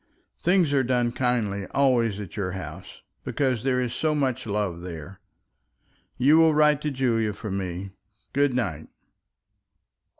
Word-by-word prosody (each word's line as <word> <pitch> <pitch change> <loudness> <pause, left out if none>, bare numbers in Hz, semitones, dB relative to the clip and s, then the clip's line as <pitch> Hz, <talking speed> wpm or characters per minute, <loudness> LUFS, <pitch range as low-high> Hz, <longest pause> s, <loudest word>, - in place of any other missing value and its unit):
Things 175 -4 +3
are 135 - +4
done 120 -1 +1
kindly 115 -6 -1
always 120 -7 +2
at 100 -5 -8
your 95 -4 -2
house, 90 0 -8 0.2
because 130 -5 0
there 130 -1 +1
is 125 -2 -1
so 155 +4 0
much 130 -5 -1
love 100 -5 -2
there. 90 +1 -8 1.0
You 145 +5 +5
will 160 -2 +5
write 150 -1 +4
to 150 - -1
Julia 115 -6 0
for 105 0 -6
me. 95 0 -4 0.4
Good 140 -2 +2
night." 90 -11 -2
120 Hz, 140 wpm, -25 LUFS, 100-135 Hz, 1.0 s, You